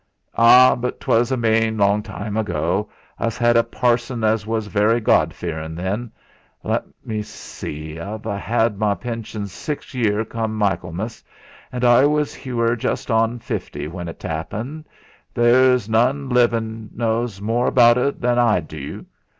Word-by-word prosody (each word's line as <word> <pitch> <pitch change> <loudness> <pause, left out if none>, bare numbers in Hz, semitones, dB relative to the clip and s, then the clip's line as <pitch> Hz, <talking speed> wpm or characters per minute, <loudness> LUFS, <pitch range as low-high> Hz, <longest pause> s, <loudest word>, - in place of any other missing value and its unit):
"Ah! 125 +2 +7
but 125 -1 -4
'twas 120 +3 +1
a 130 - +1
main 110 -1 +1
long 100 +1 +3
time 105 0 -6
ago. 95 -1 -1 0.3
Us 115 +1 -2
'ad 120 0 +3
a 115 - +5
parson 120 -1 0
as 110 -1 +1
was 110 -1 -1
very 105 +3 +2
God 110 - +3
fearin' 80 -2 -5
then. 100 +7 -3 0.5
Let - - -1 0.2
me 110 -1 -3
see, 75 -6 -8
I've 105 +5 -6
a 100 -3 -3
'ad 115 -2 +1
my 105 -2 +2
pension 115 0 -5
six 145 - -6
year 110 -3 0
come 110 -1 -3
Michaelmas, 100 +1 -2 0.5
an' 125 0 -1
I 120 +3 +6
were 130 -5 0
just 120 - -3
on 115 +1 +2
fifty 75 -9 -5
when 85 +2 -6
t'appened. 110 - -5 0.5
There's 125 -1 +4
none 130 +5 +1
livin' 115 -3 +1
knows 115 -2 -1
more 115 +4 0
about 120 -1 +5
et 140 +3 -1
than 120 0 +1
what 120 - +5
I 105 -5 +3
du. 75 -2 -8
115 Hz, 150 wpm, -21 LUFS, 105-120 Hz, 0.5 s, Ah